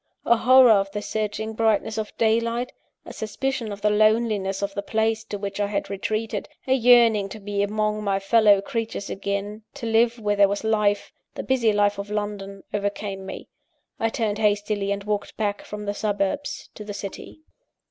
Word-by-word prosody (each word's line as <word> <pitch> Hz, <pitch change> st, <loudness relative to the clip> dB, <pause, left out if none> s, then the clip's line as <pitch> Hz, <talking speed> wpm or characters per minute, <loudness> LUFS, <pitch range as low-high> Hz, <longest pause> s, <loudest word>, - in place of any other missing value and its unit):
A 235 Hz, -, +5 dB
horror 255 Hz, +1 st, +7 dB
of 195 Hz, -2 st, +3 dB
the 210 Hz, -, -3 dB
searching 220 Hz, 0 st, -3 dB
brightness 220 Hz, 0 st, +1 dB
of 215 Hz, -, -6 dB
daylight, 230 Hz, +2 st, +1 dB, 0.3 s
a -, -, -9 dB
suspicion 235 Hz, +1 st, -3 dB
of 200 Hz, 0 st, -7 dB
the 210 Hz, 0 st, +3 dB
loneliness 215 Hz, -2 st, +2 dB
of 200 Hz, 0 st, -2 dB
the 200 Hz, -, -3 dB
place 220 Hz, +1 st, 0 dB
to 205 Hz, -, -5 dB
which 200 Hz, 0 st, -5 dB
I 205 Hz, -, +1 dB
had 200 Hz, -1 st, -3 dB
retreated, 215 Hz, +2 st, -3 dB, 0.2 s
a 260 Hz, -, +2 dB
yearning 235 Hz, -5 st, +5 dB
to 220 Hz, -, -8 dB
be 200 Hz, 0 st, -2 dB
among 215 Hz, +1 st, -1 dB
my 200 Hz, -1 st, +1 dB
fellow 205 Hz, 0 st, +4 dB
creatures 225 Hz, -2 st, -4 dB
again, 200 Hz, +2 st, -3 dB
to 275 Hz, -5 st, -6 dB
live 230 Hz, +1 st, +3 dB
where 210 Hz, -2 st, 0 dB
there 200 Hz, -1 st, +5 dB
was 200 Hz, +2 st, -2 dB
life 210 Hz, -2 st, +1 dB, 0.2 s
the -, -, -4 dB
busy 245 Hz, -4 st, +2 dB
life 205 Hz, -1 st, +2 dB
of 200 Hz, +1 st, -5 dB
London 205 Hz, -2 st, -4 dB
overcame 200 Hz, -1 st, -3 dB
me. -, -, -7 dB, 0.5 s
I 225 Hz, -, +1 dB
turned 220 Hz, -2 st, -2 dB
hastily, 205 Hz, -1 st, +1 dB
and 200 Hz, 0 st, -2 dB
walked 210 Hz, 0 st, -3 dB
back 205 Hz, -2 st, -1 dB
from 210 Hz, 0 st, -7 dB
the 205 Hz, -, -1 dB
suburbs 205 Hz, +7 st, -2 dB
to 210 Hz, -, -9 dB
the 205 Hz, -1 st, -7 dB
city. 200 Hz, +9 st, -8 dB
210 Hz, 185 wpm, -24 LUFS, 200-225 Hz, 0.5 s, horror